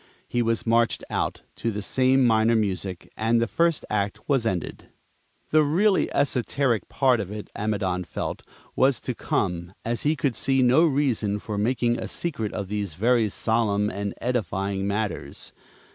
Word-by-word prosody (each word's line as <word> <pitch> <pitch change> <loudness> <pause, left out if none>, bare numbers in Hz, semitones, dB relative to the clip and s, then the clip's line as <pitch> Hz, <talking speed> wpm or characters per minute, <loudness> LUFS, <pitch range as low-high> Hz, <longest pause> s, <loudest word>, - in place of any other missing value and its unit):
He 120 - 0
was 115 -1 0
marched 115 0 +2
out, - - -2
to 115 - -1
the 105 -2 -4
same 130 +3 +3
minor 115 0 +4
music, 95 -4 -2
and 115 +2 +2
the 115 - +2
first 165 +6 +1
act 105 0 -2
was 135 -6 +2
ended. 90 -5 -4 0.6
The 155 - +6
really 185 +7 +2
esoteric 130 -3 0
part 130 -3 +3
of 100 -3 -4
it, 105 0 -7
Amidon 100 -4 -1
felt, - - -4 0.3
was 130 -2 +3
to 125 - -3
come, 90 -5 -2
as 115 0 -1
he 150 +2 +2
could 140 -4 0
see 135 +2 +1
no 130 +7 +5
reason 130 -8 +1
for 105 0 -5
making 120 +3 +1
a - - -4
secret 140 -11 -3
of 100 -2 -4
these 100 -5 -3
very 115 +3 +3
solemn 105 -1 +1
and 100 +1 -4
edifying 100 -5 -1
matters. 100 -3 -3
115 Hz, 160 wpm, -25 LUFS, 100-130 Hz, 0.6 s, The